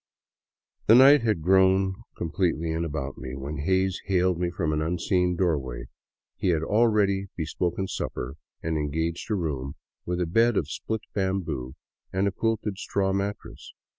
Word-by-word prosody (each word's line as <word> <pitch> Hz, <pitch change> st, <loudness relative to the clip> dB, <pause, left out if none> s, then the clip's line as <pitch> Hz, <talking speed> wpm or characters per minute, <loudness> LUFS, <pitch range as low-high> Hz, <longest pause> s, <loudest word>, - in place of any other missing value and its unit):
The 110 Hz, -, +8 dB
night 135 Hz, +3 st, +8 dB
had 110 Hz, -8 st, 0 dB
grown 95 Hz, +1 st, +4 dB, 0.2 s
completely 85 Hz, -1 st, -1 dB
in 80 Hz, +1 st, -1 dB
about 70 Hz, -4 st, -4 dB
me, 65 Hz, 0 st, -6 dB
when 70 Hz, +3 st, -5 dB
Hays 95 Hz, +4 st, +1 dB
hailed 90 Hz, -2 st, +2 dB
me 90 Hz, -1 st, 0 dB
from 85 Hz, -3 st, -1 dB
an 75 Hz, -, 0 dB
unseen 90 Hz, +2 st, +1 dB
doorway. 70 Hz, -9 st, -1 dB, 0.5 s
He -, -, -1 dB
had 80 Hz, -3 st, +2 dB
already 105 Hz, -1 st, +2 dB
bespoken 85 Hz, +3 st, -2 dB
supper 65 Hz, -7 st, -4 dB, 0.3 s
and 80 Hz, -1 st, -1 dB
en 75 Hz, 0 st, -1 dB
gaged 80 Hz, +5 st, -2 dB
a 105 Hz, -, +1 dB
room 70 Hz, -7 st, -3 dB, 0.3 s
with 90 Hz, 0 st, -2 dB
a 90 Hz, -, +1 dB
bed 115 Hz, +6 st, +3 dB
of 75 Hz, 0 st, -1 dB
split 110 Hz, +4 st, -3 dB
bamboo 85 Hz, -10 st, -2 dB, 0.4 s
and 95 Hz, +2 st, +1 dB
a -, -, +1 dB
quilted 105 Hz, -1 st, -2 dB
straw 95 Hz, -1 st, 0 dB
mat 100 Hz, +1 st, -1 dB
tress. -, -, -12 dB
90 Hz, 165 wpm, -26 LUFS, 80-100 Hz, 0.5 s, The